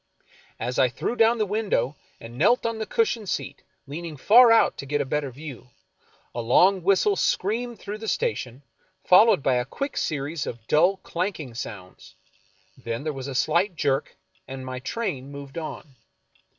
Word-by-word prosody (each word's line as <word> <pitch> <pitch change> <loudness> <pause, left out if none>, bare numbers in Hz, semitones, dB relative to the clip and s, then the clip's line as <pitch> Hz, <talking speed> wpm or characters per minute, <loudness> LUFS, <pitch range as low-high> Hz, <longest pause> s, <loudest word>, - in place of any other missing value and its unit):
As 125 +2 -2
I 130 - +4
threw 125 - -3
down 230 0 +4
the 215 - +1
window 195 - -1 0.2
and 115 +1 -10
knelt 205 - +3
on 230 -1 -2
the 220 - -3
cushioned 240 - 0
seat, - - -4 0.2
leaning 155 +2 -7
far 235 - +7
out 225 - +4
to 140 - -6
get 145 +1 0
a - - 0
better 145 +1 -2
view, 130 -1 -10 0.6
a 120 - -3
long 180 +11 +4
whistle 200 - +3
screamed 235 - -1
through 205 +2 -7
the 220 - -7
sta 475 - +1
tion, 125 +3 -8 0.4
followed 185 -4 +6
by 130 -2 +2
a 125 - +1
quick 275 - -5
series 145 +1 -2
of 115 -2 -7
dull, 180 +6 +4
clanking 170 - -3
sounds; 100 -5 -9 0.6
then 115 +3 -5
there 155 -1 -2
was 135 -1 -6
a 135 - -5
slight 170 +7 +1
jerk, 140 -2 -1 0.3
and 130 -1 -7
my 130 0 -5
train 140 - -4
moved 140 +2 -7
on. 155 -3 -8
155 Hz, 175 wpm, -25 LUFS, 130-210 Hz, 0.6 s, far